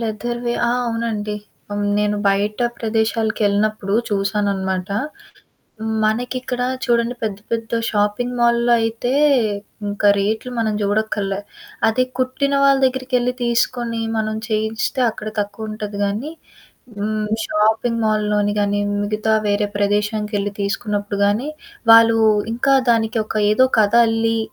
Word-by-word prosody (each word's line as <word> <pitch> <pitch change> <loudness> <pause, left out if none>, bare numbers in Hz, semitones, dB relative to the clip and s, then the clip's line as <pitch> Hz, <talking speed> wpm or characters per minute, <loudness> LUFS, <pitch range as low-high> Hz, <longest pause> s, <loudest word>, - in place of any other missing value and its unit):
లెదర్‌వే. 240 +2 -3
ఆ! - - +1 0.2
అవునండి. 225 -2 -2 0.4
ఆహ్, - - -3
హ్మ్, 205 - 0
నేను 210 0 +1
బయట 200 +2 0 0.2
ప్రదేశాలకెళ్ళినప్పుడు 215 -2 0
చూశాననమాట. 195 -2 -1 1.2
మనకిక్కడా 245 +3 -1 0.2
చూడండి 235 0 +1
పెద్ద 210 -3 -2
పెద్ద 230 -1 -2 0.2
షాపింగ్ 210 +4 0
మాల్‌లో 235 0 +3
అయితే 225 +2 -1 0.7
ఇంక 205 0 -4 0.2
రేట్లు 220 +5 -1
మనం 220 -1 +1
జూడక్కర్లే. 205 -1 -1 0.5
అదే 255 +3 +2
కుట్టిన 260 +2 0
వాళ్ళ 275 -1 +5
దగ్గరికెళ్లి 255 -1 0
తీసుకొని, 235 -1 0 0.2
మనం 215 0 -1
చేయించెస్తే 220 +4 -1
అక్కడ 215 0 -7
తక్కువుంటది 210 0 -5
గానీ, 215 +10 -3 0.7
హ్మ్, 215 +1 -2 0.2
షాపింగ్ 220 +2 +1
మాల్‌లోని 210 -1 +1
గానీ, 205 0 +1 0.2
మిగతా 215 +1 0
వేరే 205 0 +1
ప్రదేశాముకెళ్ళి 205 0 0
తీసుకున్నప్పుడు 205 0 -2
గానీ, 215 +8 0 0.4
వాళ్ళూ 230 0 +7 0.4
ఇంకా 270 +3 +2 0.2
దానికి 225 -1 +1
ఒక - - -6 0.2
ఏదో 255 +5 +5
కథ 210 +1 +2
అల్లి, 225 0 +1
215 Hz, 115 wpm, -20 LUFS, 205-235 Hz, 1.2 s, వాళ్ళూ